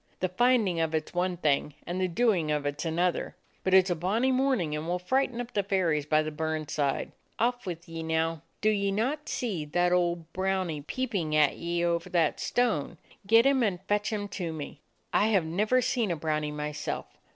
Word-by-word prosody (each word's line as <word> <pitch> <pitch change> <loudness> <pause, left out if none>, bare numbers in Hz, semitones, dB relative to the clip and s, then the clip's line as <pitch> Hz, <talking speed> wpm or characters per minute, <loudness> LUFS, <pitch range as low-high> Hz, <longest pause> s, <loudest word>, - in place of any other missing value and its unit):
The 185 - 0
finding 215 -3 +2
of 160 -1 0
it 155 -1 -2
's - - -20
one 180 0 0
thing, 150 -2 +1
and 180 +2 -3
the 185 - +2
doing 180 -4 +1
of 150 -1 0
it 145 +1 -2
's - - -4
another. 170 +2 0 0.3
But 190 0 +3
it 190 -1 +7
's - - -1
a - - +2
bonny 210 +10 +1
morning, 255 - +1
and 155 +2 -4
we - - -1
'll - - +1
frighten 250 +6 0
up 245 0 -5
the 205 - +2
fairies 175 -7 0
by 155 0 +3
the 155 - -4
burn 155 0 -2
side. 145 -2 -1 0.3
Off 245 -1 0
with 175 0 -5
ye, 165 0 -6
now. 160 0 0 0.2
Do 215 - +4
ye 200 -1 0
not 260 +9 -1
see 205 - -2
that 175 +4 +1
old 170 -2 0
brownie 185 -5 -1
peeping 185 - -2
at 150 -2 +4
ye 170 0 -1
over 170 -1 0
that 165 -4 +1
stone? 215 - 0 0.3
Get 225 +3 +6
him 275 -1 +4
and 200 -6 +1
fetch 205 +2 0
him 205 -2 -2
to 180 -4 -4
me. 155 -3 -7 0.3
I 210 - +4
have 195 -7 +2
never 210 +10 +2
seen 235 -4 0
a 170 - 0
brownie 150 -1 -1
myself. 150 0 -4
175 Hz, 215 wpm, -28 LUFS, 160-210 Hz, 0.3 s, it